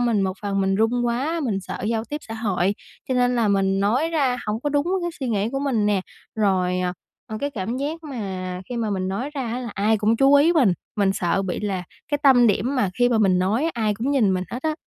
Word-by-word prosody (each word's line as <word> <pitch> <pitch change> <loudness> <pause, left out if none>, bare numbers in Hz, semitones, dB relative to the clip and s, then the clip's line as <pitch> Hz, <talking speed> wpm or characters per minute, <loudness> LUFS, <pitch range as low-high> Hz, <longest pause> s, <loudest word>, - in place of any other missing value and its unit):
mình 235 -4 +2
một 190 -1 0
phần 195 -1 -1
mình 195 0 +1
run 240 +3 +1
quá, 280 +8 -1
mình 200 -6 -1
sợ - - -6
giao 225 -1 -1
tiếp 295 - -5
xã 225 - -5
hội, 200 -3 0 0.3
cho 260 - 0
nên 250 0 +2
là 225 -3 +2
mình 195 -1 +2
nói 250 +11 +2
ra 270 -6 +1
hổng 215 +2 -2
có 290 - -1
đúng 290 +2 +1 0.2
cái 345 - -1
suy 260 - -2
nghĩ 210 -1 0
của 270 - -1
mình 250 -7 0
nè. 205 -2 +2 0.3
Rồi, 185 -4 +1
à, 180 0 -1 0.3
ờ, 215 - -5
cái 285 - -1
cảm 225 0 -3
giác 310 +4 -4
mà 190 -9 -5
khi 245 - -4
mà 225 -3 -1
mình 185 -1 -1
nói 240 +10 -3
ra 270 - -2
á, 240 +2 -3
là 245 -2 -5
ai 215 +2 +2
cũng 220 +2 +2
chú 275 +2 +5
ý 305 +5 +5
mình, 255 - +4 0.2
mình 195 -2 +2
sợ 190 +1 0
bị 185 0 -3
là 195 -3 -2 0.3
cái 290 - 0
tâm 250 -4 +6
điểm 225 +6 +1
mà 205 -7 +1
khi 245 0 +4
mà 230 -2 +2
mình 190 -4 +3
nói 220 - +1
ai 215 -3 0
cũng 235 +7 -2
nhìn 215 -9 +3
mình 185 - -2
hết 250 - -5
á. 315 -1 0
225 Hz, 260 wpm, -23 LUFS, 195-260 Hz, 0.3 s, tâm